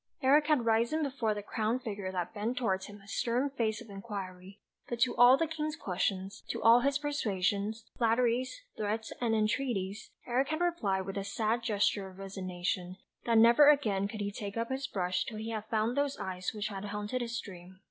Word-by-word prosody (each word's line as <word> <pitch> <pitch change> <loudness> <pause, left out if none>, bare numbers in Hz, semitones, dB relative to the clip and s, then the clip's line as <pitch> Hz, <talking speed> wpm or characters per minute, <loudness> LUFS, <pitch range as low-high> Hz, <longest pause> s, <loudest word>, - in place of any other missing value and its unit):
Eric 295 +3 +5
had 295 -7 +3
risen 235 +8 +2
before 255 -6 -1
the 205 - -5
crowned 225 +4 -1
figure 200 -4 -4
that 180 0 -3
bent 225 +4 -2
towards 190 -6 0
him 205 0 -11
a 195 - -18
stern 245 +6 0
face 220 -4 -1
of 235 - -12
inquiry, 195 -2 -7 0.3
but 240 - -3
to 255 - +3
all 245 +2 +8
the 330 - +1
King's 310 -1 -3
questions, 190 - -2
to - - -2
all 230 +1 +7
his 275 +2 +2
persuasions, 215 -6 -1
flatteries, 245 - +1
threats, 215 +1 -2
and 230 -2 +2
entreaties 215 -2 -1 0.2
Eric 255 +3 +1
had 310 +2 -2
replied 220 - +1
with 195 +1 -5
a - - -3
sad 220 +3 0
gesture 205 -3 0
of 185 - -15
resignation, 185 -1 -4 0.3
that 230 -1 +3
never 235 +6 +8
again 210 -10 +3
could 210 0 -6
he 205 0 -2
take 200 +1 -6
up 230 +2 -2
his 270 +1 -2
brush 180 -6 -1
till 220 - -7
he 220 +1 -4
had 215 -1 -4
found 220 +2 0
those 285 -1 0
eyes 185 -1 -3
which 210 0 -3
had 195 -1 -6
haunted 210 +4 -3
his 235 0 -3
dream. 185 -3 -10
220 Hz, 200 wpm, -31 LUFS, 195-245 Hz, 0.3 s, all